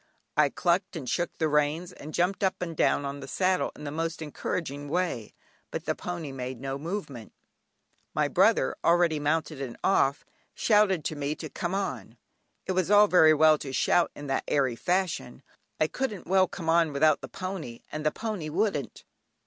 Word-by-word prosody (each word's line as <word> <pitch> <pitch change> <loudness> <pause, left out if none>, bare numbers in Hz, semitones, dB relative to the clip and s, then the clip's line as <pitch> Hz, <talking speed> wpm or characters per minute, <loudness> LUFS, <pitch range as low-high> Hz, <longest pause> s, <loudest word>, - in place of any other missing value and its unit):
I 150 -1 +4
"clucked" 180 +6 0
and 145 -6 -6
shook 175 +8 0
the 160 - +1
reins, 150 +4 +1
and 155 -2 -10
jumped 180 +5 0
up 190 - +1
and 170 -2 -4
down 145 - +2
on 140 +1 -4
the 135 - -8
saddle 185 +6 +1
in - - -11
the 145 - -4
most 165 +2 -3
encouraging 145 -2 -4
way, 165 - -2 0.3
but - - -5
the - - +1
pony 170 -5 -5
made 130 -2 -5
no 135 +1 -4
movement. 150 - -6 0.8
My - - +2
brother, - - +3
already 170 -2 +3
mounted 155 0 -1
and 125 -3 -5
off, 140 -7 +2 0.3
shouted 205 -7 +3
to 155 - -2
me 145 +1 -2
to 155 0 -7
"come 175 +2 -3
on." 200 0 -4 0.5
It - - -2
was 185 -1 0
all 205 0 +7
very 160 -5 +6
well 155 0 +5
to 135 - -6
shout 170 +5 +2
in 145 - -8
that 135 -1 -1
airy 135 -4 +1
fashion, 175 -5 -1 0.4
I - - +4
couldn't 215 +2 -3
well 190 0 +4
"come 165 - -7
on" 165 -2 +3
without 155 +1 +3
the 135 - -7
pony, 170 -7 -6
and 155 0 -4
the 155 - +3
pony 210 -5 -4
wouldn't. 185 -3 -1
160 Hz, 185 wpm, -28 LUFS, 145-180 Hz, 0.8 s, all